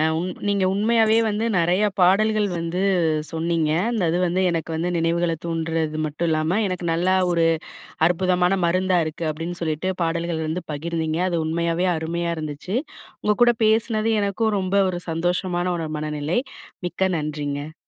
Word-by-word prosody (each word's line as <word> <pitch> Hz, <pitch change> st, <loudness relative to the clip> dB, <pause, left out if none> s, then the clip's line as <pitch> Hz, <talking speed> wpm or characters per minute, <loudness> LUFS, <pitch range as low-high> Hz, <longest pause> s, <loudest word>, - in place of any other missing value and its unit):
அ -, -, +3 dB
உங் 180 Hz, +2 st, -2 dB, 0.2 s
நீங்க 200 Hz, -1 st, +2 dB
உண்மையாவே 220 Hz, +1 st, +3 dB
வந்து 215 Hz, +1 st, -1 dB
நிறையா 180 Hz, +5 st, +3 dB
பாடல்கள் 210 Hz, +3 st, +3 dB
வந்து 170 Hz, +2 st, -2 dB, 0.5 s
சொன்னீங்க. 165 Hz, -1 st, 0 dB, 0.2 s
அந்தது 175 Hz, -7 st, +1 dB
வந்து 180 Hz, +2 st, 0 dB
எனக்கு 165 Hz, -1 st, -3 dB
வந்து 170 Hz, +2 st, -1 dB
நினைவுகள 165 Hz, 0 st, +1 dB
தூண்டுறது 165 Hz, -2 st, -2 dB
மட்டும் 155 Hz, +3 st, -2 dB
இல்லாம, 160 Hz, +5 st, +1 dB
எனக்கு 180 Hz, -2 st, -4 dB
நல்லா 180 Hz, +3 st, +2 dB, 0.2 s
ஒரு 170 Hz, -1 st, +2 dB, 0.6 s
அற்புதமான 180 Hz, +1 st, +2 dB
மருந்தா 185 Hz, +1 st, +2 dB
இருக்கு 160 Hz, +1 st, -4 dB
அப்பிடின்னு 165 Hz, +3 st, -6 dB
சொல்லிட்டு, 160 Hz, +3 st, -1 dB
பாடல்கள் 165 Hz, -1 st, -1 dB
வந்து 165 Hz, +3 st, -3 dB
பகிர்ந்தீங்க. 160 Hz, +1 st, -2 dB
அது 170 Hz, -, -1 dB
உண்மையாவே 170 Hz, +2 st, 0 dB
அருமையா 170 Hz, +2 st, -2 dB
இருந்துச்சு. 155 Hz, +7 st, -4 dB, 0.5 s
உங்க 210 Hz, 0 st, +2 dB
கூட 240 Hz, 0 st, +5 dB
பேசினது 220 Hz, 0 st, +2 dB
எனக்கும் 205 Hz, +2 st, 0 dB
ரொம்ப 185 Hz, +1 st, -1 dB
ஒரு 175 Hz, -1 st, -3 dB
சந்தோஷமான 175 Hz, +1 st, -1 dB
ஒரு 160 Hz, -2 st, -3 dB
மனநிலை. 150 Hz, +4 st, -1 dB, 0.5 s
மிக்க 190 Hz, +2 st, 0 dB
நன்றிங்க. 150 Hz, 0 st, -4 dB
170 Hz, 145 wpm, -23 LUFS, 160-185 Hz, 0.6 s, கூட